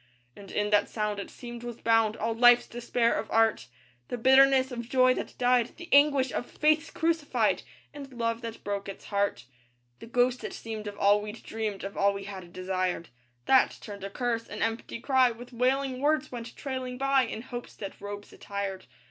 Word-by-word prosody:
And 200 -1 -12
in 210 0 -1
that 205 -1 +3
sound, 210 -2 -2
it 200 - -6
seemed, 240 -1 -9
was 240 -1 -7
bound 225 -1 +2
All 225 +1 -1
life's 240 +1 +6
despair 235 0 0
of 220 - -3
art; 225 - +2 0.4
The - - -4
bitterness 265 +2 +5
of 235 -1 -6
joy 255 -1 +5
that - - -6
died; 245 -1 +2
The 345 +1 -10
anguish 280 -2 +5
of 245 - -3
faiths 310 +1 +2
crucified; 325 -2 +1 0.3
And 280 -2 -9
love 230 -2 -2
that 230 -1 -7
broke 200 -1 -3
its 195 - -9
heart. 200 - -1 0.5
The - - -10
ghost 245 +1 +1
it - - -5
seemed 220 -2 -6
of 205 0 -7
all 205 +1 +4
we'd 210 +2 -8
dreamed, 215 -3 -4
Of 195 0 -6
all 200 0 +3
we 200 - -5
had 190 -3 -8
desired; 185 -1 -2 0.4
That 265 -1 +4
turned 200 -2 -9
a 195 - -4
curse, 230 +1 -2
an - - -4
empty 225 +1 -3
cry 260 -1 +4
With 240 +2 -10
wailing 260 +2 +1
words 300 0 +1
went 235 -2 -7
trailing 260 -2 -4
by 275 0 +3
In 225 - -6
hope's 245 -2 -8
dead 195 -2 -6
robes 205 0 -7
attired. 200 -1 -5
230 Hz, 190 wpm, -28 LUFS, 205-255 Hz, 0.5 s, life's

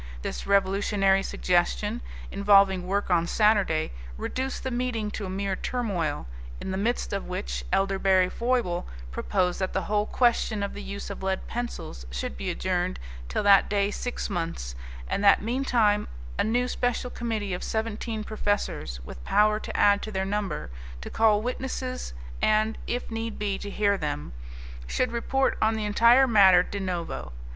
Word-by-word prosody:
This - - -4
revolutionary 195 0 +3
suggestion, 195 +6 0 0.3
involving 195 -2 +4
work 200 0 -1
on 170 -1 +3
Saturday, 200 -7 +2 0.3
reduced 260 - -3
the 260 - -2
meeting 240 -4 -1
to 205 -2 -4
a - - -6
mere 195 0 -2
turmoil, 200 - -2 0.3
in - - -4
the 190 - -2
midst 225 +2 -1
of 200 - -3
which - - -4
Elderberry 195 -1 +3
Foible 230 -5 -1 0.2
proposed 175 - 0
that 190 -1 -2
the 190 - 0
whole 210 +3 0
question 235 -4 +2
of 200 - -3
the 205 - -7
use 200 0 -6
of 200 - -7
lead 190 0 -1
pencils 235 - -5
should 60 +3 -4
be 65 - -4
adjourned - - -1 0.3
till - - -1
that 200 -1 +6
day 200 0 +1
six 245 +3 -3
months, 165 - -3 0.3
and 200 - -1
that 200 0 +6
meantime 230 -3 +2 0.3
a - - +4
new 240 +4 +1
special 245 0 -1
committee 220 -5 -3
of 180 - -4
seventeen 220 0 -3
professors, 205 - -2
with - - -9
power 210 - +3
to - - -5
add 205 0 +5
to 215 - -5
their 190 -1 -1
number, 195 - -3 0.3
to - - -7
call 215 -2 +3
witnesses 255 - -4 0.3
and, 215 +1 +3
if 245 0 -3
need 225 0 -3
be, 200 -2 -2
to 205 - -6
hear 200 -1 +1
them, 75 - -3 0.5
should 250 - 0
report 265 +3 0
on 220 +1 +3
the 215 -1 -2
entire 235 +5 +6
matter 190 -6 +7
de 200 - -5
novo. 180 - -4
205 Hz, 165 wpm, -27 LUFS, 190-225 Hz, 0.5 s, matter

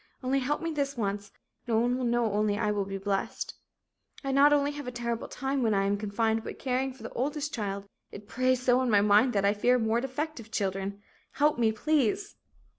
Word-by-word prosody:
Only 265 +2 +1
help 290 +5 -1
me 330 - -1
this 280 -3 -2
once, 205 -1 -2 0.4
no 225 -2 +2
one 240 +2 +2
will 255 0 -2
know 235 -3 +1
only 210 0 +1
I 210 -1 +1
will 205 -1 -1
be 195 0 -4
blessed. 195 0 -2 0.7
"I 275 - -1
not 280 +2 +6
only 290 0 +3
have 290 -2 -7
a - - -3
terrible 235 -1 -3
time 270 +1 -2
when 220 -3 +2
I 195 0 +2
am 200 +1 +2
confined 220 +2 0
but - - -7
caring 265 0 -1
for 255 -3 -14
the 225 - -7
oldest 290 +3 -2
child 200 -3 -3 0.3
it 205 0 -10
preys 255 +2 +1
so 250 0 +4
on 260 -1 +1
my 205 -2 +5
mind 210 +5 +4
that 200 -1 +1
I 200 - +4
fear 245 +4 +3
more 225 0 +1
defective 270 -2 -4
children. 200 -1 -3 0.3
Help 295 -3 +2
me 225 -2 +3
please!" 300 - 0
235 Hz, 215 wpm, -29 LUFS, 205-265 Hz, 0.7 s, not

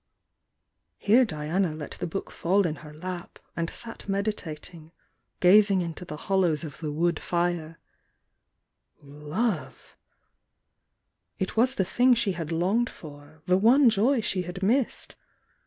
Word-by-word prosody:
Here 240 +4 +4
Diima 155 0 -1
let 150 - -7
the - - -4
book 195 +4 -5
faU 195 +4 +1
in 160 -4 -2
her 150 - -11
lap, 175 +3 -7 0.2
and 170 -1 -2
sat 230 -3 -6
mediating, 170 -5 -4 0.5
gamg 190 -1 +5
i - - -5
.to 180 +3 -9
the 150 -3 -7
hollows 175 -4 +1
of 145 -3 -8
the 155 -2 -4
wood 170 +3 0
fim 170 -2 -2 1.3
Lovel 150 - -3 1.6
It 190 - -3
was 255 +4 +3
the 190 - +1
thing 245 +6 +4
she 230 -4 +2
had 170 -3 -5
longed 195 +9 +1
for,— 150 0 -13
the 185 +1 +3
J^Ijoy 235 +1 +4
she 185 - -1
had 180 +2 -6
missed! 245 +5 0
180 Hz, 135 wpm, -26 LUFS, 155-205 Hz, 1.6 s, gamg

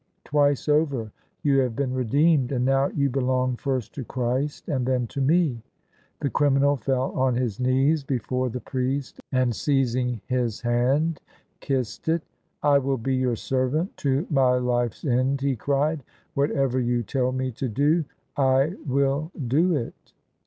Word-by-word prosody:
Twice 145 -1 +2
over 140 -7 +1 0.3
you 140 -2 +3
have 125 -4 0
been 130 -1 -1
redeemed, 135 +2 +2
and 125 -2 0
now 135 +1 +3
you 140 -1 0
belong 130 -1 0
first 130 -2 -3
to 135 - -5
Christ 130 +4 -2
and 130 -5 -1
then 125 -2 +1
to 135 +4 -5
me." 145 -4 +2 0.6
The 140 - 0
criminal 140 0 +3
fell 130 +1 -1
on 130 -1 +1
his 120 -4 -2
knees 135 +4 +2
before 130 -1 -1
the 125 +1 -5
priest, 130 +1 -3
and 130 -2 +2
seiz 135 -1 +1
ing 125 -3 -1
his 125 -4 -1
hand 130 +7 +1 0.4
kissed 135 0 -2
it. 165 0 +1 0.3
" - - -37
I 140 - +6
will 135 0 -1
be 130 +3 -1
your 130 -2 +1
servant 135 - -1
to 140 +3 0
my 130 -3 +4
life's 120 -1 -1
end," 130 +1 +1
he 140 -1 +1
cried: 145 +5 0 0.2
" - - -38
whatever 135 -2 +1
you 120 -1 0
tell 130 +2 0
me 130 0 -2
to 125 +2 -4
do 145 +8 +2 0.3
I 135 +2 +3
will 140 +3 +1 0.2
do 165 +7 +3
it." 120 -5 -6
130 Hz, 165 wpm, -25 LUFS, 125-140 Hz, 0.6 s, I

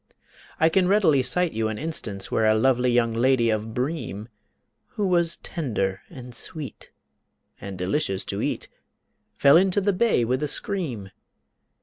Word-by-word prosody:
I 160 - +5
can 180 +2 +2
readily 185 -9 +4
cite 180 +6 0
you 110 0 -1
an 110 -1 -4
instance 110 -11 -3
Where 110 - +1
a 110 0 +4
lovely 125 +2 +2
young 120 -1 +2
lady 120 0 +2
of 110 +1 -3
Breem, 125 -6 -4 0.7
Who 205 - 0
was 170 -3 +3
tender 105 - -3
and 125 -2 -11
sweet 140 +1 -6 0.7
and 95 -1 -7
delicious 95 +2 -1
to - - -3
eat, - - -3 0.7
Fell 140 +3 +6
into 190 +2 +3
the 200 0 +1
bay 190 - +2
with 130 +4 -1
a 150 - 0
scream. 140 - -2
130 Hz, 150 wpm, -24 LUFS, 110-165 Hz, 0.7 s, Fell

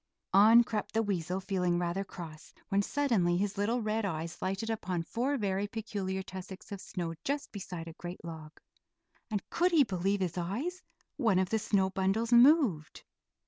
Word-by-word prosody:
On 220 +5 +8
crept 220 -3 -3
the 225 +1 +2
weasel, 185 -3 -1
feeling 180 -3 0
rather 175 +2 -1
cross, 165 -5 -10
when 200 -1 +3
suddenly 200 -9 +1
his 200 +1 -1
little 220 +4 0
red 215 +1 0
eyes 165 -4 -4
lighted 195 +4 -2
upon 185 -6 -2
four 255 - -1
very 200 -2 -1
peculiar 200 -3 -3
tussocks 190 +3 -9
of 200 -2 -5
snow 170 -2 -4
just 285 +1 -2
beside 180 -5 -6
a 165 - -8
great 175 +1 -8
log; 160 -2 -9 0.7
and 210 -3 -3
could 355 +2 +3
he 320 -4 +6
believe 195 -2 -1
his 180 -1 -1
eyes? 260 - -3 0.4
one 225 -9 +3
of 185 -1 +1
the 220 - +2
snow 190 -2 +1
bundles 195 +5 +1
moved. 240 - +5
195 Hz, 170 wpm, -31 LUFS, 180-225 Hz, 0.7 s, On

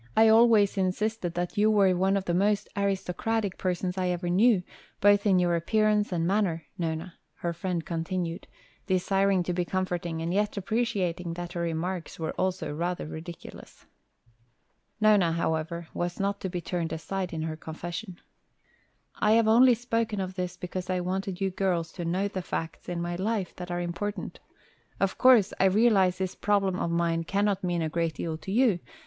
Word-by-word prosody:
"I 220 0 +7
always 220 -3 +5
insisted 190 -1 -1
that 175 +4 -2
you 215 +1 +5
were 200 -4 +4
one 190 +2 +2
of 195 - -3
the 170 - 0
most 205 +3 +2
aristocratic 200 +1 -1
persons 180 0 -1
I 185 - 0
ever 175 0 -1
knew, 200 0 +4 0.4
both 205 +1 +4
in 190 -2 +5
your 175 -1 +2
appearance 210 +4 +2
and 165 -2 0
manner, 180 -4 0
Nona," 165 +1 -3 0.2
her 170 +1 -3
friend 175 -1 -3
continued, 170 0 -3 0.4
desiring 195 0 +2
to 180 - -2
be 180 0 0
comforting 175 -2 -2
and 165 +2 -2
yet 210 +1 0
appreciating 185 -5 -1
that 175 0 -6
her 170 - -3
remarks 170 +1 -3
were 160 -1 -3
also 180 -5 -2
rather 175 +3 -2
ridiculous. 165 +2 -10 1.1
Nona, 205 -6 +4
however, 165 0 -2
was 175 0 -3
not 200 +1 -1
to 190 - -2
be 175 -1 -4
turned 170 -1 -3
aside 180 +4 -3
in 160 -2 -3
her 160 -1 -3
confession. 175 +4 -7 1.0
"I 210 +1 +4
have 225 -1 +4
only 240 +3 +6
spoken 230 -2 -1
of 190 -1 -3
this 180 -1 -4
because 180 +1 -5
I 185 -1 +1
wanted 185 +1 -3
you 195 -1 0
girls 180 -3 -1
to 175 - -6
know 185 +4 0
the 190 -2 -4
facts 165 -1 -5
in 170 -1 -2
my 175 0 -3
life 200 -1 -2
that 180 0 -7
are 175 0 -2
important. 175 +4 -4 0.6
Of 195 -1 0
course, 250 -6 +6
I 195 - +4
realize 190 -2 +4
this 190 0 -2
problem 195 -3 +1
of - - -1
mine 170 0 0
cannot 200 +2 0
mean 175 -2 0
a - - 0
great 165 -1 -1
deal 160 +1 -3
to 190 - -7
you. 225 -4 +3
185 Hz, 180 wpm, -28 LUFS, 170-200 Hz, 1.1 s, I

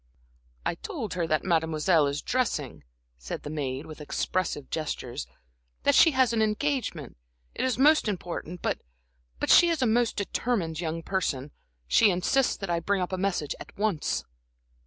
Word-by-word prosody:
"I - - +1
told 245 - -5
her 175 -2 -1
that 155 -1 +1
Mademoiselle 160 -2 +2
is 140 +1 -3
dressing," 150 - -1 0.4
said - - -6
the 145 - -6
maid, 140 -2 -3
with 155 -1 -10
expressive 150 -1 -2
gestures; 145 -4 -4 0.6
"that - - +4
she 330 - +7
has 260 -5 +3
an 225 - +2
engagement, 215 - -1 0.4
it - - -3
is 255 -4 +1
most 300 0 +5
important, 175 -3 -4
but - - -1 0.6
but - - +1
she 345 - +8
is 325 -6 +1
a - - +4
most 235 0 +2
determined 195 -5 -1
young 165 -1 -3
person, 150 -8 -2 0.4
she 205 - +5
insists 200 +9 +2
that 195 - -5
I 170 - +1
bring 195 +4 0
up 180 - -5
a - - 0
message 180 -7 -1
at - - -12
once." 205 -6 0
180 Hz, 165 wpm, -27 LUFS, 155-225 Hz, 0.6 s, she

